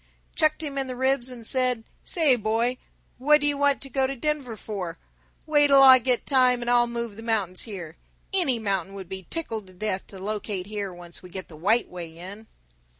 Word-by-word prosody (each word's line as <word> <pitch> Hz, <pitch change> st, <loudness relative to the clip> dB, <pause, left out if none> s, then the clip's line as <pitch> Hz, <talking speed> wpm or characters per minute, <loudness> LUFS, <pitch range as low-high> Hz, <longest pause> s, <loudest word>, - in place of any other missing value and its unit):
Chucked 310 Hz, -1 st, +2 dB
him 280 Hz, -2 st, -3 dB
in 270 Hz, -, -2 dB
the 255 Hz, -, -5 dB
ribs 260 Hz, 0 st, +1 dB
and 240 Hz, -3 st, -9 dB
said, 250 Hz, -2 st, +1 dB, 0.2 s
'Say, 315 Hz, -8 st, +3 dB
boy, 230 Hz, +3 st, 0 dB, 0.4 s
what 300 Hz, +3 st, +5 dB
do 290 Hz, -, 0 dB
you 290 Hz, 0 st, +2 dB
want 285 Hz, 0 st, +2 dB
to 275 Hz, -, -6 dB
go 265 Hz, 0 st, +2 dB
to 275 Hz, -, -4 dB
Denver 270 Hz, -4 st, -2 dB
for? 185 Hz, -7 st, -5 dB, 0.5 s
Wait 295 Hz, -2 st, +4 dB
'll 275 Hz, -1 st, +7 dB
I 260 Hz, -1 st, +10 dB
get 250 Hz, 0 st, 0 dB
time 255 Hz, -3 st, +4 dB
and 240 Hz, 0 st, 0 dB
I'll 240 Hz, 0 st, +4 dB
move 235 Hz, -3 st, -4 dB
the -, -, -8 dB
mountains 210 Hz, -6 st, -1 dB
here. 170 Hz, -6 st, -7 dB, 0.4 s
Any 340 Hz, -11 st, +2 dB
mountain 195 Hz, -3 st, -2 dB
will 195 Hz, -, -6 dB
be 190 Hz, -1 st, -8 dB
tickled 225 Hz, -11 st, -3 dB
to 185 Hz, -, -15 dB
death 190 Hz, 0 st, -3 dB
to 195 Hz, -, -11 dB
locate 200 Hz, -1 st, -3 dB
here 205 Hz, -1 st, -4 dB
once 175 Hz, -1 st, -8 dB
we 180 Hz, -, -12 dB
get 185 Hz, +1 st, -8 dB
the 160 Hz, -, -12 dB
White 210 Hz, +9 st, +2 dB
Way 170 Hz, -2 st, -8 dB
in!'" 200 Hz, +5 st, -9 dB
230 Hz, 210 wpm, -26 LUFS, 195-265 Hz, 0.5 s, I